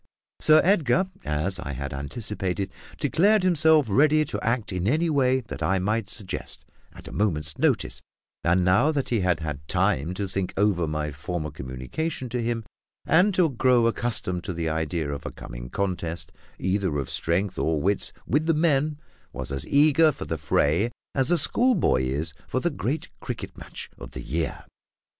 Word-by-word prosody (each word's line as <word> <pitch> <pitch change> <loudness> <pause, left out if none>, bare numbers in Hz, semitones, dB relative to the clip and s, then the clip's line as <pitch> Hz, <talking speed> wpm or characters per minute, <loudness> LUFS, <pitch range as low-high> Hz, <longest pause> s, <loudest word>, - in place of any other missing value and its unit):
Sir 155 0 +6
Edgar, 185 0 +3
as 75 +5 0
I 75 -5 -5
had 70 +1 -5
anticipated, 95 - -3 0.3
declared 205 +3 +3
himself 160 -4 +4
ready 150 +8 +4
to - - -4
act 115 -3 0
in 90 +1 -1
any 160 +6 +2
way 130 -2 +3
that 110 - -8
I 95 - +2
might 105 +2 -1
suggest, 100 -4 -5 0.3
at - - -13
a - - -8
moment's 75 -7 -1
notice; - - +1 0.4
and, 90 +1 +3
now 95 +12 +4
that 140 -4 -2
he 115 - +1
had 90 -3 +1
had 75 -2 -5
time 80 +8 +1
to 100 +1 -2
think 95 0 -3
over 95 -5 +2
my 75 0 -2
former 75 +1 -4
communication 70 - -4
to 120 +1 -2
him, 115 0 -1 0.4
and 180 +6 +5
to 175 -5 +3
grow 125 -1 +3
accustomed 110 -7 0
to 90 - -3
the 85 -1 -2
idea 80 -1 -1
of 70 0 -5
a - - -5
coming - - -8
contest, 85 -4 -3 0.3
either 95 -4 0
of 70 - -2
strength 90 +4 -1
or 80 -1 +1
wits, 100 +6 0
with 150 +5 +1
the 165 - +3
men, 150 -2 +2 0.3
was - - -5
as 70 -1 -2
eager 155 +2 +5
for - - -7
the 80 - -3
fray 75 +8 +2 0.2
as 135 +1 +2
a 175 - +4
schoolboy 235 - +2
is 75 +5 -1
for 130 - -1
the 175 +5 0
great 140 +2 -2
cricket - - -6
match - - -8
of - - -10
the - - -5
year. 80 +2 -3
100 Hz, 175 wpm, -25 LUFS, -, 0.4 s, Sir